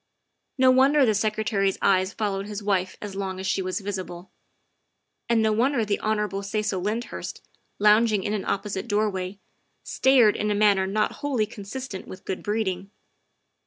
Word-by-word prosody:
No 260 -1 +6
wonder 270 +2 +5
the 220 - +3
Secretary's 210 -2 0
eyes 190 -1 +2
followed 200 -2 -2
his 210 0 -6
wife 190 -2 0
as 205 -2 -6
long 190 -1 -4
as 190 - -5
she 190 - 0
was 185 +3 -3
visible. 185 -2 -6 1.0
And 230 -1 +3
no 220 - +3
wonder 235 +2 +1
the 205 -1 -1
Hon. 210 -2 -1
Cecil 205 -1 -2
Lyndhurst, 220 +5 -4 0.3
lounging 210 0 +4
in 210 - -2
an 210 - -2
opposite 200 +2 -3
doorway, 205 -3 -1 0.5
stared 255 -6 +4
in 210 - -1
a 210 - +1
manner 200 -2 +3
not 210 +2 0
wholly 265 -7 0
consistent 210 +1 -7
with 185 - -11
good 190 - -4
breeding. 195 -3 -2
210 Hz, 160 wpm, -25 LUFS, 195-220 Hz, 1.0 s, No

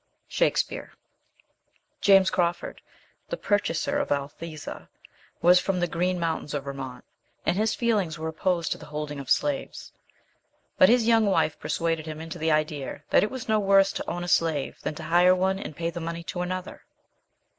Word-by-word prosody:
Shakespeare. - - 0 1.1
JAMES 195 -1 +6
CRAWFORD, 175 -1 -1 0.5
the - - -3
purchaser 200 - 0
of - - -2
Althesa, 150 +3 -5 0.5
was 180 +1 +7
from 185 0 -1
the 175 - +2
green 180 +2 -1
mountains 160 -3 -2
of 140 - -2
Vermont, 135 -2 -7 0.4
and - - +2
his 215 +2 +1
feelings 205 -9 0
were 160 +1 -4
opposed 170 +1 -1
to - - -2
the - - -11
holding 150 -1 -5
of 135 - -8
slaves. 285 -2 -1 0.9
But 280 - +8
his 240 -1 +4
young 225 -2 +4
wife 185 -5 +1
persuaded 165 -1 -1
him 155 0 -6
into 165 +2 -7
the 160 +1 0
idea 155 -2 -1
that - - +6
it 210 - +1
was 260 -3 -7
no 215 -1 +3
worse 195 -1 +4
to - - -4
own 175 0 -3
a - - -5
slave 160 -5 +1
than 155 - -3
to 160 - -8
hire 175 +3 +5
one 190 +1 0
and 155 - -7
pay 165 +1 -2
the 170 - -6
money 170 +1 -4
to 175 +1 -4
another. 185 +1 -4
170 Hz, 175 wpm, -26 LUFS, 155-195 Hz, 1.1 s, But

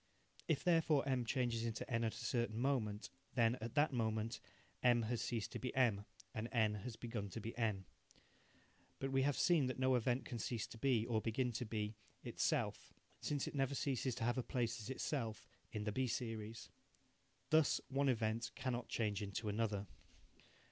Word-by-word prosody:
If - - +1
therefore 165 -5 +4
M 130 -3 +1
changes 120 -2 +1
into 115 -2 -2
N 115 -2 +1
at 110 - 0
a - - -6
certain 115 -3 0
moment, 115 -6 0 0.2
then, 115 -1 +4
at 115 0 -5
that 145 -1 +4
moment, 110 -1 0 0.4
M 120 -2 +5
has 115 +1 -1
ceased 115 -2 -2
to - - -4
be 125 - -2
M, 110 -6 +3 0.3
and 110 +2 -3
N 110 -3 +3
has 105 +3 -5
begun 115 -4 -4
to 115 - -5
be 115 +1 -5
N. 105 -5 0 1.1
But 135 0 -2
we 135 0 +3
have 140 0 +2
seen 165 -7 +4
that 130 - -2
no 130 0 +3
event 125 +1 +2
can 120 - -4
cease 115 0 -1
to 115 - -10
be, 120 -3 +3
or 115 -2 +1
begin 120 +3 0
to 120 +2 -3
be, 105 -1 -2 0.3
itself, - - 0 0.3
since 145 -2 -1
it - - -5
never 135 -1 +1
ceases 130 -3 0
to - - -3
have 120 +2 +2
a - - -1
place 120 -2 -1
as 110 - -7
itself 125 -5 -2 0.3
in 105 - -3
the 105 - -1
B 130 +4 +1
series. 115 -2 -4 0.8
Thus 155 -1 +5
one 140 0 +2
event 115 -1 +1
cannot 125 -2 -2
change 105 -2 0
into 105 +2 -2
another. 105 -1 0
115 Hz, 185 wpm, -39 LUFS, 110-130 Hz, 1.1 s, M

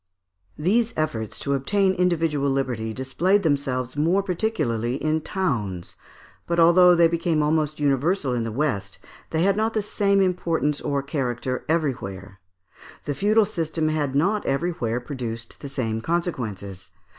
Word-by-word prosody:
] 90 0 -51
These 220 +9 +1
efforts 110 -9 -2
to 140 - -1
obtain 190 +8 +2
individual 165 -6 +1
liberty 125 -5 -1
displayed 170 - +1
themselves 135 -5 -1
more 170 +7 +2
particularly 165 - -1
in 155 +2 0
towns; 115 - -2 0.5
but 170 0 0
although 175 +2 +7
they 170 -1 +6
became 165 -2 0
almost 155 0 0
universal 145 +1 +1
in 120 -2 -1
the 115 - -3
west, 105 -7 -2 0.3
they 160 +1 0
had 195 0 +3
not 220 +2 0
the 215 - +2
same 200 -1 +1
importance 170 -5 0
or 140 -1 -1
character 130 -3 -3
everywhere. 100 - -2 0.7
The 145 - -1
feudal 210 +6 +3
system 165 -5 -1
had 145 -3 -1
not 200 +8 +2
everywhere 135 -6 -1
produced 120 -3 -6
the 140 - -7
same 115 -5 -2
consequences. 110 - -3
150 Hz, 145 wpm, -24 LUFS, 125-175 Hz, 0.7 s, although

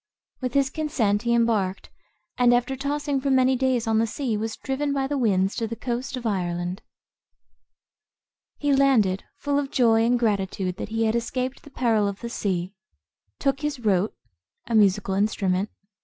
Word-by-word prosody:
With 255 0 -3
his 275 -1 +3
consent 230 -10 0
he 235 0 +1
embarked, 215 -5 0 0.4
and 245 -1 +4
after 245 +2 0
tossing 285 0 -1
for 275 - -1
many 260 0 +4
days 255 -2 +1
on 220 -1 +2
the 230 - +2
sea, 235 +1 -2
was 220 +1 -3
driven 280 +2 -2
by 275 -1 0
the 290 +2 -2
winds 195 -7 +1
to 230 -2 -1
the 230 - -5
coast 250 +3 -3
of 245 - -7
Ireland. 180 -2 -2 1.8
He 290 -1 +1
landed, 240 -9 +3
full 285 0 0
of 280 -1 -3
joy 225 -4 +3
and 245 +2 +3
gratitude 195 -5 -1
that - - -5
he 225 +1 0
had 220 +1 +1
escaped 255 +2 -2
the - - -14
peril 225 -6 +1
of 200 -1 -5
the 235 - -4
sea; 185 -4 -2 0.6
took 275 -1 0
his 295 -1 -2
rote,[Footnote: 205 -2 +1 0.5
A 235 - -4
musical 205 -2 +3
instrument. 195 -1 0
235 Hz, 170 wpm, -25 LUFS, 205-265 Hz, 1.8 s, and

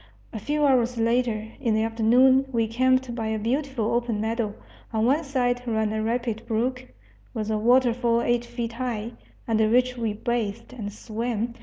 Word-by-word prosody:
A 220 - -4
few 295 +6 0
hours 250 -3 +2
later, 230 -1 +1
in 235 -5 +1
the 220 - +2
afternoon, 245 +4 +4
we 230 -2 +1
camped 255 +2 +1
by 225 -2 -3
a 220 0 -1
beautiful 235 0 -1
open 235 -2 0
meadow; 220 -1 -2 0.4
on 220 -1 +1
one 285 +6 +2
side 250 -3 0
ran 220 -2 0
a 220 - -1
rapid 230 0 -2
brook, 250 +3 -1 0.5
with 220 0 -2
a 215 - +1
waterfall 240 0 +3
eight 240 0 +1
feet 235 -1 -5
high, 235 -2 -3 0.4
under 220 -1 +2
which 250 +2 +2
we 225 -3 -1
bathed 230 +1 -3
and 210 -5 -5
swam. 230 +2 -3
235 Hz, 170 wpm, -25 LUFS, 220-250 Hz, 0.5 s, afternoon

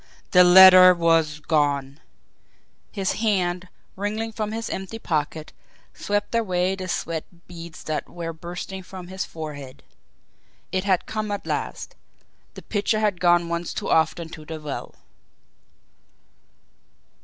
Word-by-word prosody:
THE 180 -1 +7
LETTER 185 0 +9
WAS 165 -3 +2
GONE! 145 -2 0 0.9
His 195 -3 -1
hand, 185 -4 0 0.3
wriggling 215 +3 -3
from 215 -1 -4
his 225 +1 -4
empty 190 +4 -5
pocket, 155 -5 -3 0.4
swept 205 +2 -2
away 185 -5 +1
the 190 -1 -5
sweat 165 -2 -3 0.2
beads 170 -2 -10
that 155 -1 -3
were 170 -1 -6
bursting 175 +3 -7
from 180 -1 -10
his 190 0 -4
forehead. 145 -4 -8 0.9
It 185 +1 -1
had 190 -3 +1
come 215 -1 -4
at 205 -1 -4
last - - -4 0.6
the - - -10
pitcher 215 +1 0
had 205 -4 0
gone 175 -1 +4
once 170 0 -3
too - - -3
often 160 +1 +2
to 160 -2 -10
the 160 +1 -7
well! 150 -2 -6
180 Hz, 130 wpm, -24 LUFS, 160-195 Hz, 0.9 s, LETTER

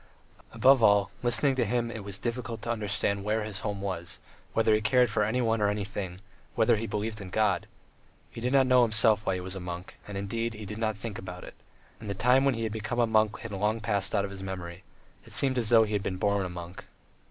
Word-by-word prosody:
Above 130 0 +5
all, 100 -2 +4
listening 120 +3 +2
to 130 -2 +1
him 120 +1 -1
it 110 -3 -6
was 100 -1 -6
difficult 115 0 -4
to 120 - -1
understand 100 -2 -1
where 105 +1 0
his 105 -1 -5
home 105 -3 -4
was, 95 -3 -4 0.4
whether 110 -1 +3
he 105 - +2
cared 125 +1 +3
for 105 - +1
anyone 115 0 +1
or 105 - +3
anything, 100 -3 -4 0.4
whether - - +4
he 110 +1 -3
believed 105 +1 -3
in 95 - -8
God.... 100 -3 +1 0.6
He 115 - -8
did 125 +2 -1
not 135 -1 +5
know 125 -1 +5
himself 110 -2 +4
why 95 - +2
he 90 - -4
was 95 +1 -5
a - - -5
monk, 90 0 -7
and, 100 -1 -5
indeed, 115 +3 -3
he 105 0 -8
did 105 +2 -7
not 110 -2 -1
think 105 0 -6
about 90 -1 -8
it, - - -10 0.5
and 110 - -8
the 100 - -2
time 125 +6 +4
when 135 -3 +3
he 115 - -3
had 110 - -2
become 110 +2 -4
a 120 - +5
monk 110 -1 +1
had 115 - -7
long 105 +3 0
passed 100 -3 -1
out 100 -1 +2
of 100 - -7
his 95 -1 -8
memory; 90 -2 -6 0.4
it - - -7
seemed 130 -2 +1
as 115 -3 +2
though 115 -2 +7
he 105 -1 -3
had 105 - +1
been 95 -1 -3
born 100 -1 +1
a - - -8
monk. 90 +1 -8
105 Hz, 245 wpm, -28 LUFS, 100-115 Hz, 0.6 s, though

